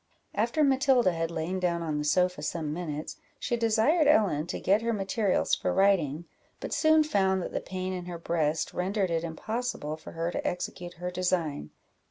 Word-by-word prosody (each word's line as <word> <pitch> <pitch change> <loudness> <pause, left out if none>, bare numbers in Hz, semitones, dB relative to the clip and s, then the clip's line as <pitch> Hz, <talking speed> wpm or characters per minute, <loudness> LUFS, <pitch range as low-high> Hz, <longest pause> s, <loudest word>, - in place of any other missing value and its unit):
After 235 +8 +1
Matilda 265 -6 +4
had 165 -1 -2
lain 170 +3 -3
down 170 -2 0
on 155 -2 -2
the - - -1
sofa 180 +4 +2
some 155 -3 -3
minutes, 155 -3 -5 0.2
she 240 - -1
desired 235 +8 +3
Ellen 190 - +3
to - - -4
get 200 +3 +3
her 230 0 0
materials 200 0 0
for - - +1
writing, 175 -6 +2 0.3
but - - -5
soon 315 -1 +5
found 190 -10 +2
that - - -5
the - - -1
pain 185 0 -4
in 180 -1 -5
her 175 -1 -6
breast 160 -2 -1
rendered 190 0 -1
it 165 0 0
impossible 170 -1 -3
for - - -11
her 165 +1 -2
to - - -3
execute 175 0 -4
her 180 +1 -4
design. 170 - -1
180 Hz, 185 wpm, -28 LUFS, 165-215 Hz, 0.3 s, soon